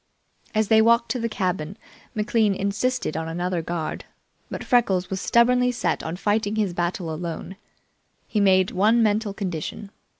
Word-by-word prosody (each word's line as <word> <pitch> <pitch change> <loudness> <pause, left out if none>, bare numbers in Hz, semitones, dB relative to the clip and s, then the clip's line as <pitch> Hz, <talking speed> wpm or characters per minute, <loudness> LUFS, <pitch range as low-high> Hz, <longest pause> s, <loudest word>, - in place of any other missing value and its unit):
As 215 -1 +1
they 220 0 +6
walked 235 +1 +3
to 255 - -1
the 230 0 -1
cabin, 185 -3 -2 0.4
McLean 215 -1 +1
insisted 200 0 -1
on 160 0 -3
another 175 +1 -2
guard, 165 -1 -4 0.4
but - - -5
Freckles 195 -8 +2
was 190 0 -2
stubbornly 250 +1 +3
set 240 - -1
on 160 +2 -4
fighting 205 +2 0
his 205 -5 0
battle 175 -1 -2
alone. 170 +3 -5 0.7
He 215 - -1
made 190 -2 +4
one 220 +5 +3
mental 210 -1 0
condition. 195 +1 -5
200 Hz, 155 wpm, -24 LUFS, 180-225 Hz, 0.7 s, they